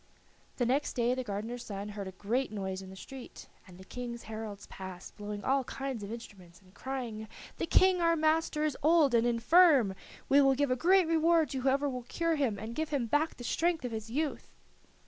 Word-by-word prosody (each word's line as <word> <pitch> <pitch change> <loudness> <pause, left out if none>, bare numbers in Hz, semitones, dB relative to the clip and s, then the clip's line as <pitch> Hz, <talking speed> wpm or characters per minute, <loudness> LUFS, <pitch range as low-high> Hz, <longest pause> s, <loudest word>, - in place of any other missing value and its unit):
The 245 - +1
next 270 +5 +1
day 240 0 +1
the 255 0 -2
gardener's 225 +3 -5
son 200 0 -6
heard 205 -2 -6
a - - -6
great 225 +8 -1
noise 190 -2 -4
in 190 - -10
the 190 - -10
street, 260 +6 -10 0.2
and 180 -1 -14
the 190 - -12
King's 235 +3 -7
heralds 215 -2 -7
passed, 185 -2 -9
blowing 205 0 -6
all 270 0 +2
kinds 270 -4 -4
of 200 +1 -6
instruments, 195 -7 -10
and 185 -2 -23
crying: 235 -4 -5 0.3
"The - - -1
King, 370 -1 +4
our 335 0 +4
master, 310 -1 +1
is 305 -3 0
old 310 -3 +4
and 235 0 +4
infirm. 245 - +5 0.3
He 280 +1 +6
will 270 -1 +4
give 285 -1 +1
a - - +3
great 365 +7 +4
reward 330 0 +3
to 265 - -2
whoever 275 +2 +2
will 250 -2 -3
cure 330 +7 -1
him 260 -9 0
and 220 +3 -6
give 315 +4 -2
him 280 -5 0
back 295 +7 0
the 245 - -8
strength 330 +3 0
of 245 - -3
his 220 -1 -5
youth." 295 +5 -3
245 Hz, 210 wpm, -31 LUFS, 210-295 Hz, 0.3 s, He